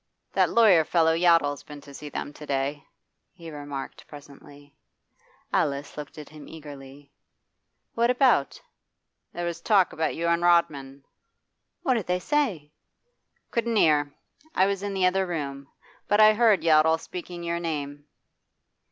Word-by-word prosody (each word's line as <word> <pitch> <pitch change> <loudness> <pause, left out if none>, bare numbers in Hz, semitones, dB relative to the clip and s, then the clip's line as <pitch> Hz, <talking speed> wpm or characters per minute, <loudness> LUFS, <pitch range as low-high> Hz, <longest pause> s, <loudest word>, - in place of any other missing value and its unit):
'That - - +3
lawyer 210 -8 +5
fellow 160 0 +2
Yottle's 165 -4 +2
been 150 -1 -11
to 140 0 -14
see 150 +1 -9
them 145 - -6
to 150 - -12
day,' 140 +1 -2 0.5
he 170 -3 -11
remarked 145 -2 -8
presently. 145 0 -15 0.8
Alice 140 0 -1
looked 150 0 -9
at 150 -2 -10
him 150 -1 -13
eagerly. 140 -2 -12 0.8
'What 235 +1 +1
about?' 250 - +2 0.7
'There 175 - -5
was 170 -1 -4
talk 195 -5 +3
about 160 0 -2
you 170 - -3
and 170 0 +1
Rodman.' 140 -6 +1 0.8
'What 260 - +2
did 225 -6 -2
they 180 0 +1
say?' 200 - -1 0.8
'Couldn't 235 -1 -1
hear. 150 -6 +3 0.4
I 190 - +4
was 200 -1 -1
in 200 -1 -4
the 190 -1 +2
other 190 +1 +1
room. 140 -5 -5 0.4
But 205 - +2
I 215 0 +7
heard 220 -3 +3
Yottle 160 0 +4
speaking 175 0 -8
your 170 0 -2
name. 145 -3 -5
160 Hz, 145 wpm, -25 LUFS, 145-185 Hz, 0.8 s, I